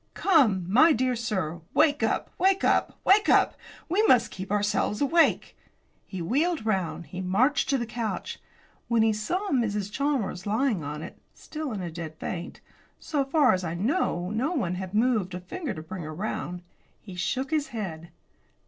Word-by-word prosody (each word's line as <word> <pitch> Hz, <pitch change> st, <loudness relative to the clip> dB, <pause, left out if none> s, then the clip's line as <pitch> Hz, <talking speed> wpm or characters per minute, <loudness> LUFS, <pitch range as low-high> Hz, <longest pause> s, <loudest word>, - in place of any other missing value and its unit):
"Come, 240 Hz, -, +3 dB
my 305 Hz, -, +6 dB
dear 255 Hz, 0 st, +1 dB
sir, 185 Hz, -9 st, -3 dB
wake 295 Hz, 0 st, +4 dB
up, -, -, 0 dB
wake 385 Hz, +2 st, +3 dB
up, -, -, +1 dB
wake 415 Hz, +3 st, +5 dB
up! -, -, +4 dB, 0.3 s
We 375 Hz, +6 st, +2 dB
must 240 Hz, -2 st, +4 dB
keep 190 Hz, +1 st, -7 dB
ourselves 210 Hz, 0 st, 0 dB
awake." 320 Hz, +4 st, +2 dB, 0.5 s
He 185 Hz, -3 st, -5 dB
wheeled 295 Hz, -, 0 dB
round; 190 Hz, -5 st, -1 dB
he 180 Hz, +5 st, -7 dB
marched 225 Hz, +11 st, +2 dB
to 275 Hz, -, +3 dB
the 240 Hz, -, -2 dB
couch. 230 Hz, -1 st, -4 dB, 0.5 s
When 230 Hz, -2 st, +3 dB
he 220 Hz, -1 st, +3 dB
saw 360 Hz, -, -2 dB
Mrs. 210 Hz, -6 st, 0 dB
Chalmers 245 Hz, -9 st, -1 dB
lying 220 Hz, -, +1 dB
on 150 Hz, +2 st, -5 dB
it, -, -, -10 dB, 0.2 s
still 305 Hz, -3 st, -6 dB
in 200 Hz, -4 st, -4 dB
a 170 Hz, -, -5 dB
dead 160 Hz, -1 st, -7 dB
faint 170 Hz, +2 st, -6 dB, 0.4 s
so 290 Hz, -3 st, -1 dB
far 275 Hz, -2 st, +3 dB
as 185 Hz, 0 st, -1 dB
I 165 Hz, -1 st, -3 dB
know 195 Hz, -, 0 dB
no 255 Hz, +10 st, -1 dB
one 195 Hz, -, -1 dB
had 185 Hz, +2 st, -5 dB
moved 215 Hz, -6 st, +1 dB
a -, -, -4 dB
finger 280 Hz, -, -5 dB
to 155 Hz, -, -7 dB
bring 185 Hz, +3 st, -7 dB
her 155 Hz, -1 st, -6 dB
round 180 Hz, -2 st, -4 dB, 0.4 s
he 195 Hz, -, -11 dB
shook 260 Hz, -, -2 dB
his 305 Hz, -2 st, +1 dB
head. 180 Hz, -10 st, -6 dB
215 Hz, 175 wpm, -27 LUFS, 180-280 Hz, 0.5 s, my